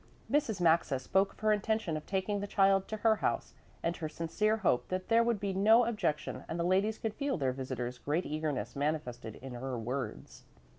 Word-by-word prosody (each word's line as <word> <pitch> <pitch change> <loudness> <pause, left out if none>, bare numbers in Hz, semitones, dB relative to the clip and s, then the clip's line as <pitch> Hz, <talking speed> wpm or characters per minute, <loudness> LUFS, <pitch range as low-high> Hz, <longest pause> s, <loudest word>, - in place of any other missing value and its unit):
Mrs. 280 -9 +1
Maxa 165 -5 +3
spoke 190 +10 +1
of - - -22
her 215 0 +3
intention 210 -4 0
of 155 - -6
taking 195 +1 -1
the 205 - -4
child 195 -1 +3
to 215 - -4
her 220 -1 +5
house - - -1 0.3
and 170 +1 0
her 155 -2 -4
sincere 210 +8 0
hope 180 - +1
that 185 0 -3
there 230 0 +5
would 230 -3 +1
be 200 -1 -2
no 220 +5 +5
objection 210 -10 -2
and 165 - -3
the - - +1
ladies 195 +5 +2
could 220 -2 -3
feel 280 0 -1
their 130 -4 0
visitor's 125 -2 -4
great 155 +8 -1
eagerness 150 -7 -3
manifested 140 -6 -2
in 130 -1 -9
her 125 +1 -4
words. 125 +4 -5
180 Hz, 200 wpm, -32 LUFS, 140-210 Hz, 0.3 s, her